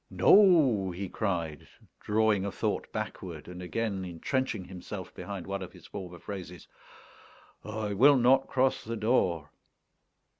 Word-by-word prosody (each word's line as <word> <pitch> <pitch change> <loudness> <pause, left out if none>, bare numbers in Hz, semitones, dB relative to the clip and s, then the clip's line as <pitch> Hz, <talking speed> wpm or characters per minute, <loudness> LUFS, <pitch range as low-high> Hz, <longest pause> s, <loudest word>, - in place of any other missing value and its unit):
"No," 150 - +5
he 95 +2 -5
cried, 85 -9 -3 0.3
drawing 105 -2 +2
a 100 - -2
thought - - -2
backward, - - -6
and 90 0 -8
again 100 +1 -2
entrenching 95 +4 -2
himself 95 +1 -8
behind 90 -1 -6
one 100 0 -4
of 90 - -8
his 90 -3 -15
former 90 -3 -8
phrases; 90 -2 -8 1.0
"I 105 -1 -3
will 135 +7 +6
not 130 +2 +4
cross 130 0 +1
the 115 +1 -4
door." 95 - +1
100 Hz, 135 wpm, -29 LUFS, 90-115 Hz, 1.0 s, will